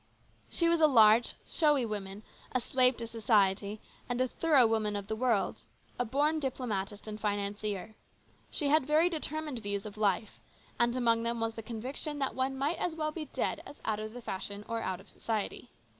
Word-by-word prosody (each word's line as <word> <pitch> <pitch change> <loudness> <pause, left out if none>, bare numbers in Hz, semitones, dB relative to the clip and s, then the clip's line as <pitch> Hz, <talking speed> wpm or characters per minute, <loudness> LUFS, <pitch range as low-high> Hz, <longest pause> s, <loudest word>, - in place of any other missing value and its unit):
She 335 - +1
was 335 -1 +3
a 310 - +8
large, 225 -3 +6
showy 295 -6 +2
woman, 205 -1 -5 0.3
a 255 - +3
slave 255 +1 +3
to 235 - -3
society, 210 -2 +1 0.3
and 245 0 -1
a 255 - +3
thorough 290 -2 +4
woman 220 -2 +1
of 200 -1 -3
the 220 - -3
world; 235 -3 +1 0.4
a 245 - +1
born 295 +6 +1
diplomatist 215 -7 -3
and 215 0 -6
financier. 205 0 -2 0.6
She 290 - -1
had 300 -2 +3
very 315 +4 +4
determined 310 -4 -3
views 200 -1 -3
of 210 0 -8
life, 210 0 0 0.4
and 240 0 +3
among 230 -2 +2
them 235 0 -1
was 225 0 -1
the 225 - -6
conviction 250 +6 -5
that 270 -2 -1
one 265 +1 -1
might 285 +5 0
as 345 -3 -1
well 310 -1 -1
be 310 0 -5
dead - - -2
as - - -12
out 215 -1 0
of 215 0 -6
the 245 - -8
fashion 200 +1 -5
or 230 0 -2
out 185 -1 -2
of - - -16
society. 220 -3 -4
230 Hz, 190 wpm, -31 LUFS, 210-275 Hz, 0.6 s, a